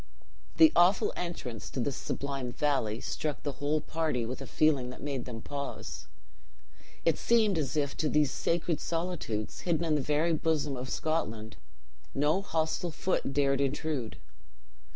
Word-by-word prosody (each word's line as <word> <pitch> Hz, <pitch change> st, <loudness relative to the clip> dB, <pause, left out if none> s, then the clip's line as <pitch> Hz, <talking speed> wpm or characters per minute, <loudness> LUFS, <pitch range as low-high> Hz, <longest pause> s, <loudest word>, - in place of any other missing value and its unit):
The 320 Hz, -1 st, +9 dB
awful 180 Hz, +3 st, +5 dB
entrance 135 Hz, -10 st, -5 dB
to -, -, -5 dB
this 130 Hz, +2 st, 0 dB
sublime 135 Hz, -3 st, -3 dB
valley 120 Hz, -7 st, 0 dB
struck 150 Hz, -2 st, -3 dB
the 145 Hz, -, -1 dB
whole 150 Hz, +2 st, +2 dB
party 155 Hz, -8 st, -1 dB
with 125 Hz, +4 st, -5 dB
a 135 Hz, -, -6 dB
feeling 145 Hz, -5 st, +2 dB
that 125 Hz, -, -9 dB
made 140 Hz, -4 st, -2 dB
them 115 Hz, -3 st, -7 dB
pause. 140 Hz, -1 st, -5 dB, 1.0 s
It 165 Hz, -, +3 dB
seemed 220 Hz, -4 st, +4 dB
as 150 Hz, +1 st, -1 dB
it 145 Hz, -1 st, +2 dB
to 155 Hz, -, +2 dB
these 150 Hz, -2 st, +3 dB
sacred 165 Hz, -2 st, 0 dB
solitudes, 165 Hz, -11 st, -2 dB
hidden 170 Hz, -1 st, 0 dB
in 160 Hz, -, +2 dB
the 150 Hz, -, +2 dB
very 150 Hz, +4 st, +2 dB
bosom 150 Hz, -3 st, +1 dB
of 130 Hz, +1 st, -5 dB
Scotland, 115 Hz, -9 st, -2 dB, 0.6 s
no 150 Hz, +7 st, +3 dB
hostile 165 Hz, -1 st, -1 dB
foot 165 Hz, -3 st, -1 dB
dared 140 Hz, -1 st, +2 dB
intrude. 140 Hz, -3 st, -1 dB
150 Hz, 150 wpm, -30 LUFS, 130-160 Hz, 1.0 s, The